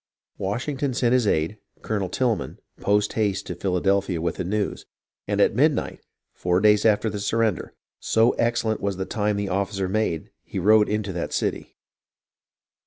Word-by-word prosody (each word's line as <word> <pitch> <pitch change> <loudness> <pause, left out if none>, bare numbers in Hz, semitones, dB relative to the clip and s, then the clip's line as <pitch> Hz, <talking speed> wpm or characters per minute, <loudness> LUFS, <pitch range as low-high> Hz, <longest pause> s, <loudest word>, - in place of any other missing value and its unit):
Washington 130 +7 -2
sent 120 -1 +2
his 125 -4 +3
aide, 80 +5 0 0.2
Colonel 100 -4 -2
Tilghman, 120 +2 -1 0.2
post 105 +1 +1
haste 105 -3 0
to - - -4
Philadelphia 95 0 0
with 85 +1 -2
the - - -2
news, 100 +3 -2 0.4
and - - -1
at - - +4
midnight, - - +1 0.3
four 90 0 +1
days 105 +1 +4
after 110 +1 +2
the 105 -1 -3
surrender, 110 -2 -1 0.2
so 115 +2 +3
excellent 115 -2 0
was 100 -2 -2
the 95 - -2
time 105 -1 -1
the 100 -1 -2
officer 95 0 -1
made, 95 -5 -1
he - - -7
rode 105 +3 +4
into 105 -2 -2
that 85 - -4
city. - - -2
105 Hz, 160 wpm, -24 LUFS, 95-110 Hz, 0.4 s, at